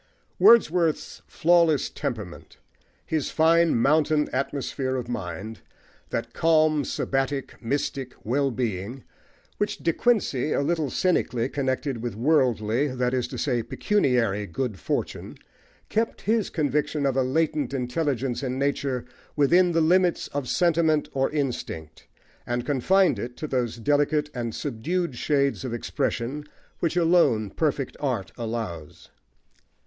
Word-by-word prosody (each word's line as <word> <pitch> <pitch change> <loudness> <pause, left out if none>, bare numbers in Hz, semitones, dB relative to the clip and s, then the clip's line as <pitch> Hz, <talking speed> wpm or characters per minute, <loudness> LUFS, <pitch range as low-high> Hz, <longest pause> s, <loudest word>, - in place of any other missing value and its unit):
Wordsworth's 175 -8 +4
flawless 165 -3 +3
temperament, 110 - -6 0.5
his 155 -3 -1
fine 165 +1 +4
mountain 150 +4 +2
atmosphere 135 0 -2
of 125 -2 -3
mind, 105 -1 -5 0.5
that - - -3
calm, 155 -2 +3
sabbatic, 135 0 -2
mystic, 135 0 -2
wellbeing 120 -3 -1 0.6
which 205 - -1
De 165 - 0
Quincey, 190 - +1
a - - +1
little 155 -1 0
cynically, 125 -10 +1
connected 135 -2 -2
with 120 -3 -4
worldly 125 -1 +2
(that 125 -2 -1
is 125 -1 0
to - - -7
say, 125 -5 0
pecuniary) 115 - +1
good 105 +2 -3
fortune, - - -3 0.5
kept 225 +1 -1
his 220 -1 +1
conviction 150 -1 0
of 135 -2 +1
a 135 - +3
latent 145 +1 0
intelligence 135 -1 -1
in 130 -1 -3
nature 140 -2 -1 0.3
within 175 +5 +4
the 165 -1 +2
limits 180 +2 +3
of 140 -3 -4
sentiment 160 -3 +2
or 135 0 +1
instinct, 120 - -4 0.4
and 120 0 -2
confined 180 +8 +3
it 120 +1 -6
to - - -4
those 125 -5 -1
delicate 145 +4 +1
and 120 -2 -4
subdued 150 +5 -2
shades 140 +1 0
of 125 -3 -3
expression 125 +4 -2 0.4
which 170 0 -1
alone 155 - +3
perfect 145 -4 -1
art 125 -9 -2
allows. 110 -10 -6
140 Hz, 125 wpm, -25 LUFS, 120-155 Hz, 0.6 s, Wordsworth's